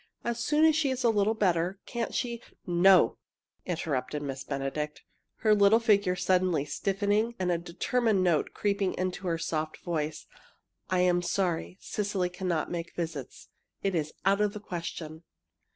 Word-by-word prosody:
As 235 0 -2
soon 300 +3 +4
as 315 -1 +5
she 310 -3 +2
is 260 -1 -2
a 235 - +5
little 210 +1 +2
better, 180 -2 +1
can't 235 -1 -3
she 235 -2 -2
" - - -42
"No," 180 +2 +5 0.5
interrupted 150 -4 -2
Miss 135 -1 -4
Benedict, 145 +2 -4 0.4
her 215 -1 +5
little 205 +2 +6
figure 205 -5 +3
suddenly 180 -5 +2
stiffening 205 +7 0
and 180 -1 0
a 170 - +1
determined 195 +4 0
note 170 -4 +2
creeping 200 -2 0
into 185 +1 -3
her 165 -1 +1
soft 155 -1 -3
voice. 155 -3 -3 0.6
"I 185 -1 +2
am 175 -1 +3
sorry. 175 -1 -1
Cecily 200 -3 -1
cannot 180 -3 -2
make 170 -1 -5
visits. 160 -6 -5 0.3
It 195 -1 +1
is 155 -3 -1
out 200 +1 +3
of 210 -1 +1
the 210 - -6
question!" 165 -4 -6
185 Hz, 160 wpm, -29 LUFS, 165-205 Hz, 0.6 s, little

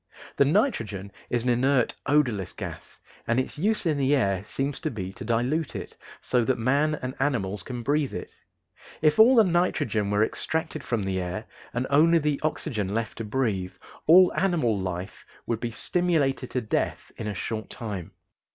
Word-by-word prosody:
The 140 - +5
nitrogen 115 - 0 0.2
is 120 -1 0
an 125 - 0
inert, 125 +1 +2
odorless 125 - +1
gas, - - -8 0.3
and 115 +2 +2
its 130 - -3
use 210 +3 +1
in 155 -4 +1
the 140 +1 +3
air 100 -8 +1
seems 135 +6 -3
to - - -2
be 95 -5 -5
to - - -9
dilute 125 +8 0
it, - - -6 0.3
so 125 -2 +2
that 130 +2 +1
man 140 +6 +2
and 130 0 -3
animals 105 -8 0
can 120 +3 -5
breathe 145 +2 0
it. - - -6 0.7
If 155 +3 +4
all 240 +4 +8
the 225 - +7
nitrogen 165 - +1
were 105 +1 +3
extracted 160 +5 -2
from 115 -4 -1
the 95 -1 -1
air 90 +5 -4 0.3
and 125 +2 -1
only 165 +4 +5
the 150 -3 0
oxygen 110 -10 -2
left 115 +1 -3
to - - -2
breathe, 105 -6 -1 0.3
all 180 +3 +7
animal 165 - +2
life 95 -1 -5 0.2
would 115 -2 -1
be 120 - -2
stimulated 140 0 0
to 125 - -1
death 110 - -2
in 110 - -5
a 105 - -3
short 110 +3 -4
time. 105 -8 -5
125 Hz, 180 wpm, -26 LUFS, 105-150 Hz, 0.7 s, all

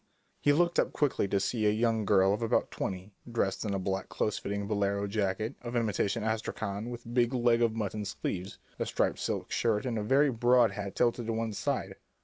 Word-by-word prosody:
He 145 - +3
looked 170 +3 +3
up - - +1
quickly 145 -8 +1
to 100 0 +1
see 110 +2 0
a - - +5
young 110 0 +1
girl 95 -1 +4
of 105 - -2
about 115 - +1
twenty 95 +2 -4 0.2
dressed 105 -4 0
in 100 -3 -1
a - - +1
black 95 0 -2
close 105 - -1
fitting 100 0 -3
bolero 100 -1 0
jacket 105 +3 -1
of 120 0 -5
imitation 110 -1 0
astrakhan 110 -1 -3
with 120 -1 -8
big 120 +1 +2
leg 120 -1 +3
of 115 -2 +2
mutton 105 -1 -3
sleeves, 95 -1 -4 0.2
a - - -1
striped - - 0
silk - - -3
skirt, 110 -2 +1
and 120 -3 -1
a - - -2
very 135 +5 +4
broad 120 -1 +4
hat 100 0 -5
tilted 120 -1 +1
to 115 - 0
one 110 -1 -2
side. - - -2
110 Hz, 205 wpm, -30 LUFS, 100-120 Hz, 0.2 s, a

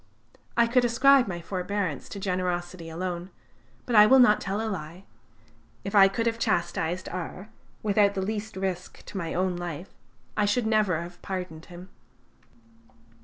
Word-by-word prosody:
I 235 - +6
could 245 +2 +3
ascribe 255 +2 +5
my 175 -2 -4
forbearance 185 -2 -3
to 200 - -7
generosity 180 -2 -3
alone, 175 +1 -4 0.6
but 240 - -1
I 210 0 +9
will 265 - +7
not 245 -5 +6
tell 195 +2 -2
a 225 - -2
lie. 175 -2 -6 0.8
If 195 - -5
I 195 -2 +8
could 225 +4 -2
have 230 0 0
chastised 175 -4 -1
R 185 +3 -6 0.3
without 205 -1 +3
the 190 - -1
least 215 0 -4
risk 185 -2 -4
to - - -8
my 165 -2 -4
own 185 0 0
life, 175 0 -6 0.4
I 210 - +2
should 220 +3 +1
never 215 -6 +2
have 175 +1 -11
pardoned 180 -4 -5
him." 180 +2 -11
190 Hz, 160 wpm, -27 LUFS, 175-215 Hz, 0.8 s, I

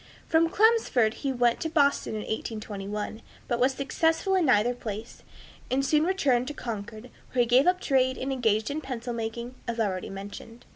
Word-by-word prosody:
From 330 0 +3
Chelmsford 420 - +3
he 275 +1 -3
went 240 -2 +2
to 320 - -2
Boston 285 -6 +2
in 215 - -3
1821, 210 -1 -5 0.3
but 240 - -1
was 260 +2 +3
successful 325 +8 +1
in 365 -5 +3
neither 240 0 +4
place, 225 -1 -7 0.5
and 270 +1 +1
soon 305 +2 +3
returned 275 -10 +1
to 295 - -5
Concord, 220 0 -6 0.2
where 250 - +3
he - - +4
gave 250 +6 +4
up 365 0 +3
trade 260 -4 +2
and 270 +1 -2
engaged 220 -2 +1
in 305 +2 -3
pencil 245 -3 -5
making, 235 +2 -4
as 235 0 -3
already 190 -4 -1
mentioned. 205 +4 -9
245 Hz, 180 wpm, -27 LUFS, 220-280 Hz, 0.5 s, neither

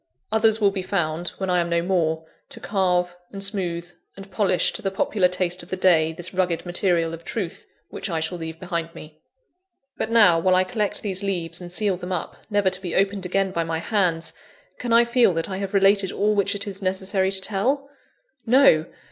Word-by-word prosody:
Others 220 0 +3
will 200 -2 +3
be 195 -1 -3
found, 175 -3 -2
when 190 -1 -2
I 180 - +3
am 170 0 -1
no 170 0 +1
more, 160 -3 0 0.2
to - - -8
carve, 180 -3 0 0.2
and 195 -1 -5
smooth, 175 -4 -2 0.3
and 195 0 -11
polish 195 -2 +2
to - - -2
the 195 - -1
popular 195 0 +1
taste 180 0 -1
of 170 - -13
the 185 - -3
day 165 -4 +4
this 175 +3 -6
rugged 180 -2 0
material 175 -2 0
of 165 0 -8
Truth 185 -3 -5 0.2
which - - -5
I 165 -2 -1
shall 160 +2 -3
leave 160 0 -6
behind 170 -2 -4
me. 155 -1 -12 0.8
But 220 - -2
now, 210 -8 +5
while 185 +2 +3
I 185 - +4
collect 210 0 -1
these 190 -2 -2
leaves, 185 -4 -2
and 175 -1 -8
seal 195 0 +2
them 180 +1 -7
up, 180 -3 -3
never 205 -3 +2
to 185 - -3
be 175 -3 -4
opened 195 -1 +1
again 195 +1 0
by 170 -2 -1
my 165 0 -2
hands, 170 -3 0 0.5
can 245 - -3
I 235 +1 +6
feel 235 -5 +3
that 165 +4 -2
I 190 - -3
have 195 0 -4
related 195 -1 +4
all 210 +1 +1
which 200 0 0
it 200 +1 -2
is 200 -1 -4
necessary 190 0 0
to 195 - 0
tell? 235 +9 0 0.6
No! 240 - +5
185 Hz, 210 wpm, -23 LUFS, 170-200 Hz, 0.8 s, I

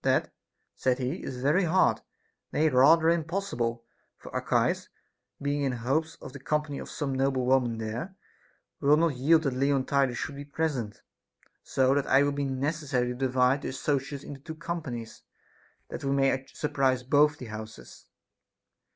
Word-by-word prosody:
That, - - +1 0.4
said 130 -1 +1
he, 135 +6 -3
is 125 -1 -6
very 160 +7 +3
hard, 185 +3 +3 0.5
nay, 155 +1 +2
rather 155 +5 +5
impossible; 160 -9 -1 0.3
for - - -12
Archias, - - 0 0.5
being 145 +1 -1
in 135 -2 0
hopes 140 +7 -1
of 130 - -11
the 140 - -8
com 150 +3 0
pany 145 -2 -6
of - - -8
some 140 -3 -3
noble 130 -1 +1
women 125 -3 +2
there, 115 - -5 0.6
will 145 +2 +4
not 165 -1 +2
yield 155 +6 +4
that 135 -4 0
Leontidas 135 -1 +1
should 140 - -4
be 140 - -6
present, 145 -7 -3 0.6
so 130 0 +2
that 140 -1 0
it 135 +2 +5
will 145 - +1
be 140 0 -2
necessary 135 -1 -1
to - - -2
divide 130 +1 +2
the - - -4
associates 140 +1 -2
into 140 -2 -9
two 160 +2 -8
companies, 155 -9 -6 0.7
that - - -7
we 135 - -1
may 135 -1 +1
sur 150 - -3
prise 130 -2 +1
both 150 +3 +3
the 125 - -8
houses. 110 - -10
140 Hz, 165 wpm, -28 LUFS, 130-150 Hz, 0.7 s, rather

